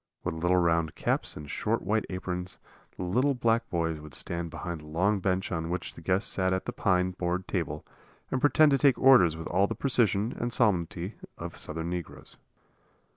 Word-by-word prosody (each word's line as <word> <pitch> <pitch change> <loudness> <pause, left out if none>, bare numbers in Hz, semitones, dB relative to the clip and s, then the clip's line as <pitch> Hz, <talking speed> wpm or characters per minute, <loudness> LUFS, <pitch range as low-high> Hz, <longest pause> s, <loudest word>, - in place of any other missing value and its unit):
With - - -2
little 90 +1 +3
round 85 -2 +1
caps - - 0
and 75 - -8
short - - -1
white 110 +4 0
aprons, 90 -1 -3 0.4
the - - -4
little 125 +10 +1
black 115 -1 +1
boys 80 -2 -1
would 75 -3 -7
stand 85 +4 -3
behind 85 0 -6
the 75 - -13
long 95 +7 +1
bench 95 0 -1
on 80 -2 -2
which 90 0 -3
the - - -12
guests 95 +5 0
sat 95 -1 +1
at 95 - -2
the - - -2
pine 90 -1 +1
board 90 0 -2
table 80 -5 -3 0.5
and 130 - 0
pretend 145 +1 +5
to 135 - +3
take 140 -2 +4
orders 120 -12 +6
with 80 - -7
all 95 +3 +2
the 115 - -4
precision 115 -3 +1
and 120 +1 -2
solemnity 95 -4 0 0.2
of - - -7
Southern 80 +2 -4
negroes. 90 -1 -7
90 Hz, 190 wpm, -28 LUFS, 85-110 Hz, 0.5 s, orders